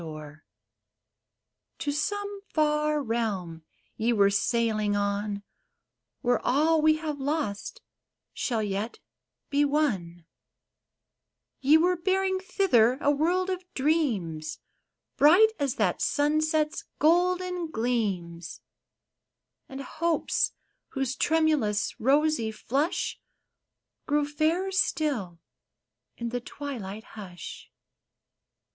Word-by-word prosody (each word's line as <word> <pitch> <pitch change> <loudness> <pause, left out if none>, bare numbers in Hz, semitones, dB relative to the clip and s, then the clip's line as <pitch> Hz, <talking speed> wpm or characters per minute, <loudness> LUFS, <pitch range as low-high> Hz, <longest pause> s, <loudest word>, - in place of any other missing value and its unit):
THE - - -8
THREE 155 -1 -8
SHIPS 155 - -23 1.3
To 290 - -2
some 405 +7 -2
far 300 -1 +1
realm 205 -9 -2 0.3
ye 230 +2 +1
were 200 -3 +4
sailing 215 -1 +1
on, 205 0 -1 0.8
Where 245 -2 +1
all 310 +5 +3
we 310 0 +5
have 310 -2 -4
lost 270 -8 -3 0.5
shall 230 -4 -1
yet 205 +3 -3 0.5
be 285 +1 +3
won; 200 - 0 1.3
Ye 285 +4 +6
were 360 +3 +3
bearing 380 +2 +1
thither 260 - +3
a 290 - +3
world 355 +6 +1
of 370 0 -3
dreams, 220 - 0 0.6
Bright 360 +10 +7
as 280 -2 0
that - - 0
sunset's 305 +1 +1
golden 360 +2 +2
gleams; 195 - -2 1.1
And 270 +1 -6
hopes 330 +4 0 0.4
whose 270 -2 -1
tremailous, 305 -10 +1
rosy 280 -2 +2
flush, 275 +8 -2 0.9
Grew 295 0 +2
fairer 320 +6 0
still 275 - 0 0.8
in 235 0 -3
the 245 +1 -3
twilight 230 -7 -6
hush. 190 -7 -10
280 Hz, 100 wpm, -27 LUFS, 215-315 Hz, 1.3 s, Bright